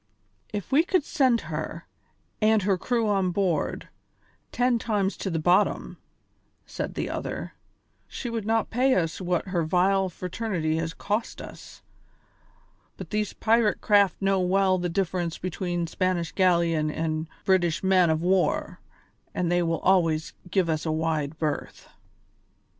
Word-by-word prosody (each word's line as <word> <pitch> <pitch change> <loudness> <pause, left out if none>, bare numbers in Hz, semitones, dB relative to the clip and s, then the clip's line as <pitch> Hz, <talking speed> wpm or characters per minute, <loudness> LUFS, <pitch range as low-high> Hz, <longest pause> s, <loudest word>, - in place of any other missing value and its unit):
"If 205 -3 -5
we 290 +4 +5
could 365 -2 +1
send 255 -5 +2
her, - - -5 0.6
with 215 -1 +4
her 195 0 +2
crew 230 +4 0
on 195 -3 +1
board, 180 -2 -1 0.6
ten 245 -1 +2
times 205 -4 0
to 195 - -3
the 165 - -1
bottom," 175 +6 +1 0.7
said - - -5
the - - -2
other, - - -5 0.5
"she - - -6
would 225 -3 -3
not 225 0 +1
pay 255 +3 +3
us 165 0 -1
what 180 +1 -1
her 180 -2 0
vile 185 +3 +2
fraternity 180 -3 -2
has 165 +1 -3
cost 215 +3 -2
us. - - -11 1.1
But - - -9
these 210 -1 -1
pirate 225 -1 +2
craft 200 -3 +3
know 195 -1 +2
well 185 +1 +2
the 175 0 -1
difference 175 -2 -1
between 175 -1 -3
a - - -3
Spanish 175 -1 -1
galleon 170 -4 +2
and 155 0 -2
a - - -28
British 185 -2 +2
man 185 -2 +4
of 160 +1 0
war, 180 -3 +1 0.6
and 175 -1 0
they 175 0 +3
will 165 -1 -1
always 165 -4 +2 0.2
give 185 -1 +1
us 155 -2 -1
a 160 - -1
wide 155 -2 -1
berth." 155 -2 -3
185 Hz, 150 wpm, -26 LUFS, 165-205 Hz, 1.1 s, we